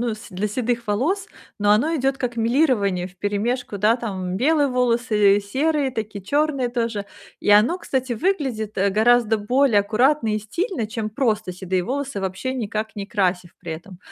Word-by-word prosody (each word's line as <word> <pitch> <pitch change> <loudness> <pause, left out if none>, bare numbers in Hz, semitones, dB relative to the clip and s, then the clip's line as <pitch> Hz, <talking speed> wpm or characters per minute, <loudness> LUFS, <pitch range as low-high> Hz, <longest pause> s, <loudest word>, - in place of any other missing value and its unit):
ну, 235 -2 -1
с 215 - -12
для 190 +3 -2
седых 235 +1 -2
волос, 330 - 0 0.3
но 205 0 +2
оно 295 +11 +3
идет 270 0 0
как 245 -1 -3
мелирование 225 - +2
вперемешку, 205 +4 -2
да, 220 +4 +3
там 190 -6 -4
белые 290 +4 +3
волосы, 230 -5 +3
серые 275 +6 0
такие, 210 -3 -5
черные 280 +3 0
тоже. 230 -4 -2 0.3
И - - -4
оно, 215 - +5
кстати, 260 -6 -2
выглядит, 260 - -1
э, 195 +1 +2
гораздо 225 +1 +3
более 245 +1 +3
аккуратно 225 +2 +2
и - - 0
стильно, 285 - -3
чем 220 -1 -4
просто 215 -5 -1
седые 185 0 -2
волосы, 275 -3 -3
вообще 190 +7 -3
никак 220 -3 -3
не 200 -1 -4
красив 180 -4 -1
при 165 - -6
этом. 175 +3 -10
225 Hz, 165 wpm, -22 LUFS, 205-260 Hz, 0.3 s, оно